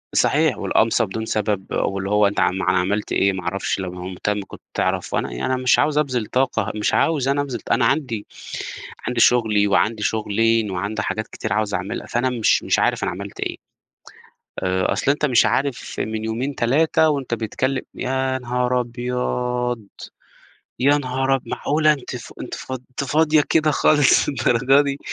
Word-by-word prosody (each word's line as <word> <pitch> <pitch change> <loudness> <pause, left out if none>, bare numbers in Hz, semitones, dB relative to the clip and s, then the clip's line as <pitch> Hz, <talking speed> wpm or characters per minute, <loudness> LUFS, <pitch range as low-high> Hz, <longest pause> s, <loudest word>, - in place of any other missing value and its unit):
صحيح، - - +3
والقمصة 115 +1 +2
بدون 110 +3 -5
سبب 105 -3 -1
واللي 95 0 -1
هو 105 0 +4
أنت 100 - -2
عم 95 - +2
ما 95 - -2
ما - - +3
عملت 100 +3 -1
إيه 100 0 +2
ما 95 -1 -5
اعرفش 95 +3 -2
لو 95 -2 -4
مه 90 0 -7
مهتم 105 +3 -2
كنت - - -12
تعرف، - - -1
أنا - - -1
يعني - - -4
أنا 130 - -2
مش 125 - +4
عاوز 150 0 +2
أبذِل 130 -7 0
طاقة 115 -4 0
مش 105 - 0
عاوز 145 -5 +2
أنا 140 +1 +2
أبذِل 140 -3 -4
ط - - -7
أنا - - +3
عندي 115 -9 0 0.8
عندي 125 -1 -1
شغلي 110 -4 +4
وعندي 105 +2 +1
شغلين 110 0 +1
وعندي 100 +4 -2
حاجات 110 0 -3
كتير - - -4
عاوز 105 -1 -1
اعملها 95 +1 -3
فأنا 120 +2 0
مش 120 -4 +2
مش - - +1
عارف - - +1
أنا - - 0
عملت 100 +3 -8
إيه - - -3 1.1
آآ، 95 0 +1
أصل 140 - 0
أنت 150 +1 +1
مش 125 -5 +4
عارف 140 -2 -2
من 110 0 -3
يومين 120 +6 -2
3 155 +6 +3
وأنت 140 -5 -1
بتكلم 125 +4 -2
يا 130 0 -1
نهار 125 0 0
أبيض! 125 -1 -2 0.9
يا 145 +3 +4
نهار 135 0 0
أب 135 - -1
معقولة 155 +1 +2
أنتِ 140 -4 -5
ف - - -10
أنتِ - - -5
ف - - -8
أنتِ 130 +2 -5
فاضية 155 +2 +3
كده 155 -1 +3
خالص 145 -1 +4
للدرجة 135 +1 +3
دي؟ 140 -1 -3
120 Hz, 180 wpm, -21 LUFS, 105-135 Hz, 1.1 s, هو